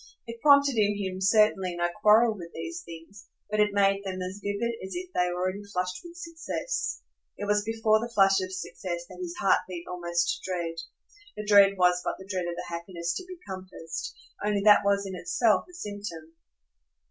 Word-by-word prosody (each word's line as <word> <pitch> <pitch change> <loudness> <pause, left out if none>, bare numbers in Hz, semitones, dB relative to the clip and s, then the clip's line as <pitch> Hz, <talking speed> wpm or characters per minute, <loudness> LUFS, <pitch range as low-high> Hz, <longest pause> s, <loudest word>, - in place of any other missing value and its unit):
It 230 -1 -9
prompted 280 -3 +5
in 205 -1 +2
him 190 -2 -4
certainly 195 -3 +3
no 175 0 +2
quarrel 220 +2 +6
with 170 -4 -9
these 340 0 -5
things, 180 - -12 0.2
but 215 - 0
it 210 0 +4
made 200 0 +2
them 190 -1 -4
as 185 +2 -5
vivid 205 +4 -1
as 190 - -6
if 365 0 -6
they 180 - +2
already 185 +3 -2
flushed 180 -2 -3
with 345 0 -11
success. 340 +8 -4 0.3
It 205 - -4
was 205 0 +2
before 220 0 +2
the 235 +2 -4
flush 195 -3 +4
of 185 0 -4
success 180 -2 -5
that 180 0 -13
his 175 -1 -5
heart 195 - +4
beat 175 -2 -6
almost 175 -1 -1
to 190 - -5
dread. 170 -2 -3 0.6
The 210 - -5
dread 200 -1 +6
was 180 0 +4
but - - -2
the 190 - -11
dread 185 -3 -2
of 170 - -3
the - - -5
happiness 170 0 -4
to - - -7
be 365 -1 -9
compassed; 185 -3 -6 0.3
only 205 -1 +1
that 210 -1 +7
was 200 0 +2
in 190 - -5
itself 220 +4 +2
a - - -16
symptom. 205 - -7
195 Hz, 195 wpm, -28 LUFS, 180-215 Hz, 0.6 s, that